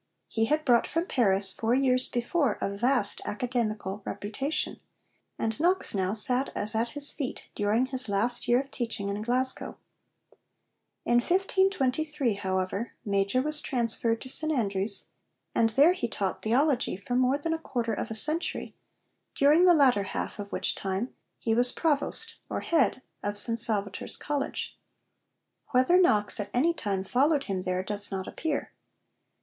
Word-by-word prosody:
He 225 0 0
had 305 +6 0
brought 240 -3 +3
from 330 +2 -1
Paris, 195 - +2
four 230 +2 0
years 255 -1 +2
before, 245 0 -1
a 200 - -3
vast 240 -1 +2
academical 215 -4 -3
reputation, 225 +11 -3 0.6
and 225 +2 -3
Knox 360 +4 +1
now 190 -1 -1
'sat 250 +5 +1
as 210 +2 0
at 230 +2 0
his 290 0 +7
feet' 275 -4 -5
during 215 +4 +1
his 260 -3 -1
last 225 +5 +1
year 240 +1 +4
of 275 0 -14
teaching 230 -5 -3
in 200 +1 -3
Glasgow. 255 +3 0 1.3
In 240 - +3
1523, 315 - 0
however, 190 +3 -3
Major 200 +5 +1
was 300 0 0
transferred 230 -2 0
to - - -8
St 310 +4 +3
Andrews, 200 -6 +1 0.5
and 225 - +2
there 285 +10 +5
he 365 - -3
taught 195 -4 -3
theology 250 -1 +1
for 200 +5 -6
more 255 +2 +2
than 325 +3 -2
a 325 - -3
quarter 235 -7 -3
of 225 - -4
a 220 - -4
century, 310 +9 -1 0.6
during 300 +6 +4
the 355 -1 +6
latter 260 -8 +4
half 200 +1 -5
of 205 0 -7
which - - -1
time 195 +5 -4 0.2
he 225 - -1
was 245 +2 +5
Provost 330 +9 +1
or - - -3
Head 265 -6 +1 0.2
of 205 0 -3
St 230 +2 +2
Salvator's 205 -3 +1
College. 290 -2 -4 0.9
Whether 260 +9 +4
Knox 210 - +4
at 205 - -4
any 320 +8 +3
time 200 - -3
followed 275 +8 +1
him 195 -6 -3
there 185 0 -2
does 205 +1 -2
not 190 -1 -4
appear. 310 -3 -3
240 Hz, 155 wpm, -27 LUFS, 205-280 Hz, 1.3 s, his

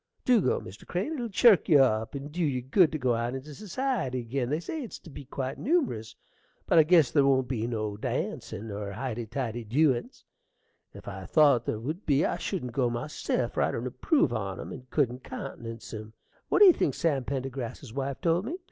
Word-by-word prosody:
Do 245 -4 +5
go, 130 - +1
Mr. 95 +4 -12
Crane: 190 - -2
it'll 245 -6 -3
chirk 210 0 +5
you 155 - +7
up 115 -3 +2
and 140 +1 -6
dew 175 +3 -1
you 130 -5 0
good 155 +6 +4
to 155 - -2
go 130 -4 +1
out 120 +2 -1
into 140 +3 -7
society 205 - -2
ag'in. 120 +1 -2
They 150 +3 0
say 310 - -5
it's 240 - -7
to 165 - -14
be 140 0 -9
quite 130 0 -4
numerous. 255 - 0 0.5
But 165 - +5
I - - +8
guess 155 -5 +5
ther 145 -2 +4
won't 130 -2 +3
be 115 -3 -2
no 110 -3 -3
dancin' 110 0 -4
nor 100 -1 -5
highty 120 0 -4
tighty 120 -1 -3
dewin's. 125 +2 0 0.7
If - - -13
I 95 -1 -7
thought 145 -7 +4
ther 110 - -1
would 155 - -5
be 145 0 +3
I - - -1
shouldn't 145 -11 -3
go 125 0 +1
myself; 120 +6 -2
for - - 0
I - - +3
don't - - -3
approve 285 - +1
on 95 -4 -3
'em, - - -7
and 130 -2 -10
couldn't 130 -3 0
countenance 115 -3 -7
'em. 110 0 -7 0.4
What - - +3
do - - +11
you 365 - +9
think 140 - 0
Sam 150 -6 +1
Pendergrass's 130 -2 -5
wife 135 0 -3
told 170 +3 +1
me? 320 +9 -4
135 Hz, 210 wpm, -28 LUFS, 120-160 Hz, 0.7 s, do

